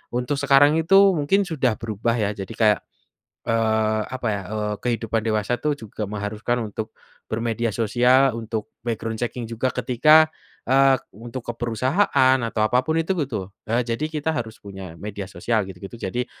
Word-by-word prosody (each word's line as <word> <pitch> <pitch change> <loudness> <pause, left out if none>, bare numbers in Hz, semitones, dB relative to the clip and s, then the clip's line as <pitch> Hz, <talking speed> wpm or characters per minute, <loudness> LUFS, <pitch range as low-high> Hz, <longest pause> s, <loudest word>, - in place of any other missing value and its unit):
untuk 125 +4 0
sekarang 140 +2 +5
itu 175 +4 +3 0.2
mungkin 195 +8 +2
sudah 135 -9 0
berubah 115 +1 -1
ya 105 -1 +1
jadi 95 +3 -6
kayak, 105 -3 +4 0.7
eee, 110 -1 +2
apa 125 -3 -3
ya, 100 - -3
eee, 105 -1 -2
kehidupan 115 -2 -1
dewasa 110 +2 0
itu 150 -1 +1
juga 105 - -5
mengharuskan 105 +3 -2
untuk, 110 +1 -5 0.4
bermedia 115 +1 -1
sosial 125 +4 +3
untuk 110 -1 -5
background 115 -1 -3
checking 120 0 -3
juga 115 +3 -1
ketika, 150 +6 +5 0.4
eee, 135 0 +5 0.2
untuk 115 +4 -8
ke 120 - -2
perusahaan 130 - +2
atau 115 -2 -2
apa 125 +4 +3
pun 160 +2 0
itu 165 +4 +1
gitu, 115 - -3 0.2
eee, 120 +2 +2
jadi 115 +3 -3
kita 155 0 -2
harus 115 -2 -5
punya 95 -4 -9
media 100 +2 -6
sosial 110 +5 0
gitu 90 - -9
gitu 95 - -9
jadi 125 +2 -3
115 Hz, 165 wpm, -23 LUFS, 110-130 Hz, 0.7 s, sekarang